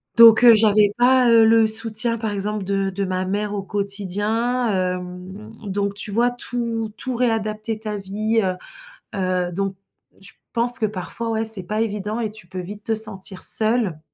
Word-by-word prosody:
donc 230 0 +7
heu, 235 -1 +8
j'avais 210 -1 +3
pas, 250 0 +3
heu, 230 -1 +5
le 225 0 +4
soutien, 225 +1 +2
par 220 -1 -3
exemple, 205 +1 -4
de 195 0 -2
de 195 +1 -4
ma 185 0 -3
mère 205 +2 -3
au 200 - -5
quotidien, 205 +5 -2
hem, 185 +2 -5
donc 200 0 -3
tu 205 0 -4
vois? 235 +4 +1
Tout 235 -3 -4
tout 260 -2 -5
réadapter 220 -2 -2
ta 215 -1 -5
vie, 215 +3 -2
heu 185 -1 -2 0.6
heu, 185 -2 -2
donc 195 +2 -4 0.5
je 195 +3 -11 0.2
pense 240 +1 +6
que 220 - -1
parfois, 215 +3 -3
ouais, 225 0 -2
c'est 220 -4 +4
pas 215 +5 -3
évident 210 0 -4
et 225 -2 -3
tu 210 -2 -14
peux 185 +1 -9
vite 205 +3 -9
te 225 - -2
sentir 200 -3 0
seule. 215 -7 +4
215 Hz, 180 wpm, -20 LUFS, 195-225 Hz, 0.6 s, heu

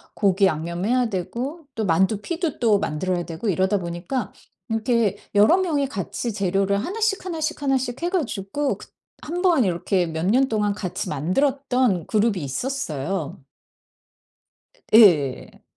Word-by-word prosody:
고기 195 -1 +3
양념해야 185 +10 0
되고 255 - -4
또 220 -2 -1
만두 190 +5 +2
피도 335 - -3
또 215 -4 +3
만들어야 175 +3 -1
되고 170 +6 -5
이러다 190 +3 +2
보니까 175 +9 -4 0.4
이렇게 225 -3 +1 0.2
여러 215 - +6
명이 305 -7 0
같이 215 +2 -4
재료를 195 0 +1
하나씩, 420 +2 -1
하나씩, 320 -3 -3
하나씩 265 -1 -1
해 350 - +1
가지고 280 - -2
그 - - -12 0.3
한번 345 -4 +2
이렇게 180 0 0
몇 160 +1 -3
년 260 +5 +3
동안 210 -2 +1
같이 190 -4 -4
만들었던 250 - +1
그룹이 210 -6 +1
있었어요. 160 - -3 1.5
예. 165 - +5
210 Hz, 285 characters per minute, -23 LUFS, 180-270 Hz, 1.5 s, 여러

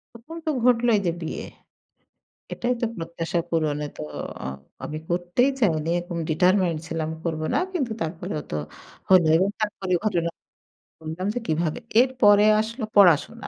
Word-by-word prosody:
তখন 240 +9 -10
তো - - +2
ঘটলই 240 -2 +4
যে - - +3
বিয়ে। 160 - -4 1.1
এটাই 245 +1 -1
তো 235 - +1
প্রত্যাশা 165 0 -3
পূরণে 150 -3 0
তো - - -6 0.4
অ - - -4 0.4
আমি 155 - -4
করতেই 175 +9 +1
চাইনি 160 -8 +1
এরকম 175 -1 -5
determined 180 0 +2
ছিলাম 160 -1 -3
করব 160 -2 -2
না। - - +3
কিন্তু 270 -10 -1
তারপরেও 165 0 -4
তো - - -2 0.5
হলো 185 -3 +6
এবং 190 +4 +2
তারপরে 200 -3 -2
ঘটনা 170 -5 0 0.7
বললাম 160 +4 -4
যে 245 - -2
কিভাবে। 160 0 0 0.2
এরপরে 210 -5 +5
আসল 225 +4 -3
পড়াশোনা। 200 +4 +4
180 Hz, 145 wpm, -24 LUFS, 165-220 Hz, 1.1 s, হলো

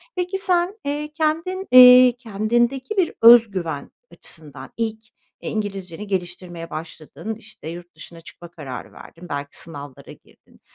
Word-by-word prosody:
Peki 365 +1 -2
sen, 370 +2 0
eee, 295 +1 -3
kendin, 330 +5 -2
eee, 250 0 +9
kendindeki 240 - -1
bir 360 -4 +1
öz 230 -1 +8
güven 165 -7 -5 0.2
açısından 145 -5 -6
ilk, 220 -1 -3 0.4
eee, - - -5
İngilizceni 200 -3 -5
geliştirmeye 175 -3 -5
başladın, 165 +7 -7
işte, 215 -7 -14
yurt 175 0 -10
dışına 165 +1 -11
çıkma 170 +1 -13
kararı 140 -7 -9
verdin, 175 +1 -14
belki 140 0 -4
sınavlara 145 -5 -5
girdin. - - -21
210 Hz, 135 wpm, -21 LUFS, 165-260 Hz, 0.4 s, eee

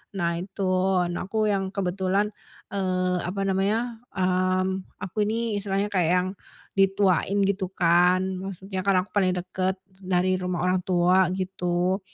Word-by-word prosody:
Nah 170 -2 0
itu, 195 +2 -5 0.5
nah 175 - -4
aku 215 0 +1
yang 195 -1 0
kebetulan, 195 +2 0 0.4
eee, 185 -2 0
apa 195 +2 -3
namanya, 215 +5 0 0.2
mmm, 185 0 0 0.2
aku 205 +3 -1
ini 225 -2 -1
istilahnya 200 +1 -1
kayak 175 -4 +2
yang 180 +1 +1 0.5
dituain 195 0 +3
gitu 195 -1 0
kan, 180 +1 +4 0.2
maksudnya 190 0 -5
kan 195 -1 +3
aku 210 - -18
paling 185 -3 +2
deket 185 +1 -2 0.2
dari 185 0 +1
rumah 180 -1 -2
orang 185 0 +2
tua 180 +1 +4
gitu. 185 0 -1
185 Hz, 140 wpm, -25 LUFS, 180-195 Hz, 0.5 s, kan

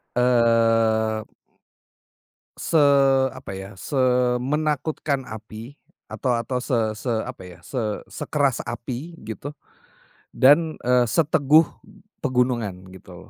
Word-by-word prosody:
Eee. 115 -2 +2 1.4
Se - - -3 0.6
apa 130 -7 -8
ya, 95 +1 -8
semenakutkan 135 +3 0
api, 110 +3 -10 0.3
atau 125 -3 -1
atau 120 +2 -2
se 125 +1 -2 0.2
se - - -8 0.2
apa 120 -7 -9
ya, 90 -2 -12
se 130 - -4 0.3
sekeras 140 -4 0
api 125 +7 -6
gitu, 110 +7 -7 0.8
dan, 155 +4 +5
eee, 125 -1 +3
seteguh 155 +1 +4 0.6
pegunungan, 120 -7 -1
gitu 95 - -13
125 Hz, 95 wpm, -23 LUFS, 115-140 Hz, 1.4 s, dan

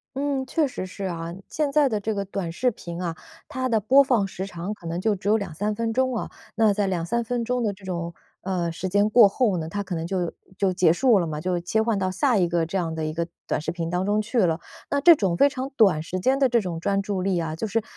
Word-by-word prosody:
嗯， 275 -1 -1
确 310 +2 +1
实 220 -7 -5
是 195 +2 -8
啊。 170 -2 -4 0.2
现 300 -3 -1
在 295 -1 +4
的 215 -4 -1
这 215 +1 -2
个 200 0 -2
短 190 -3 -4
视 250 +9 +1
频 170 -4 -8
啊， 170 -2 -3 0.3
它 260 -4 -2
的 225 - +3
播 265 +7 +5
放 240 -7 +2
时 190 0 -5
长 180 +2 -5
可 170 -5 -11
能 170 +1 -2
就 210 +2 +1
只 195 +1 -3
有 220 - +5
2-3 205 +2 -3
分 230 +1 -1
钟 260 +2 +1
哦， - - -5 0.2
那 220 -2 +4
在 200 -1 0
2-3 185 +6 -1
分 235 0 -2
钟 250 +1 0
的 215 -3 0
这 190 0 -16
种， 170 -2 -4 0.3
呃， 180 -3 -2
时 180 +3 -4
间 205 +2 +3
过 220 -3 +7
后 205 -2 +1
呢， 160 0 -4
它 200 +4 -3
可 190 - -6
能 165 -1 -3
就 180 -2 -2 0.2
就 195 -2 +1
结 180 -3 +4
束 230 +4 +4
了 170 - -1
嘛， 150 -1 -4
就 180 +2 -1
切 220 +6 0
换 220 -3 0
到 185 - 0
下 230 +6 +2
一 180 -3 +3
个 170 -1 +1
这 165 - -7
样 165 -4 -1
的 160 - -2
一 155 - -3
个 170 +1 -2 0.2
短 - - -1
视 - - -3
频 170 -1 -4
当 180 +1 0
中 205 +2 +1
去 215 +3 -1
了。 170 -5 +2 0.3
那 285 - +1
这 335 +3 +8
种 190 - 0
非 280 - +6
常 265 -1 -4
短 190 -9 +4
时 175 +3 -4
间 260 +8 +2
的 270 -2 +4
这 240 -1 +3
种 180 -6 -4
专 200 +3 0
注 195 -2 -2
力 190 -1 0
啊， 160 -2 -2
就 220 - -3
是， 220 +1 0
195 Hz, 285 characters per minute, -24 LUFS, 175-230 Hz, 0.3 s, 这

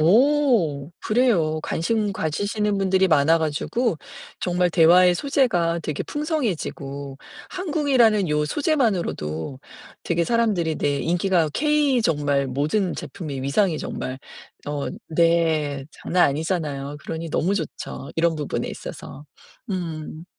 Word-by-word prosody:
오 205 - +3
그래요. 195 -10 +2
관심 205 +4 -1
가지시는 205 +5 -1
분들이 190 0 +3
많아 160 0 +4
가지고 165 +7 -1 0.4
정말 180 -1 +1
대화의 175 +2 +6
소재가 175 - +1
되게 150 -2 -3
풍성해지고 160 - -3 0.3
한국이라는 275 - +2
요 150 0 +1
소재만으로도 175 - -1 0.4
되게 170 0 0
사람들이 205 -9 +1
내 145 -1 0
인기가 175 -1 +1
케이 295 - +2
정말 145 -7 +1
모든 155 +9 0
제품의 145 -8 -6
위상이 155 +5 +1
정말 130 +1 -5 0.5
어 145 -1 -3 0.2
네. 160 -4 +2
장난 180 0 +1
아니잖아요. 145 -2 -3
그러니 165 0 -5
너무 180 +5 0
좋죠. 155 -5 -5
이런 165 0 +2
부분에 150 -2 -3
있어서. 145 - -8 0.5
음 165 -3 -5
170 Hz, 275 characters per minute, -23 LUFS, 150-210 Hz, 0.5 s, 대화의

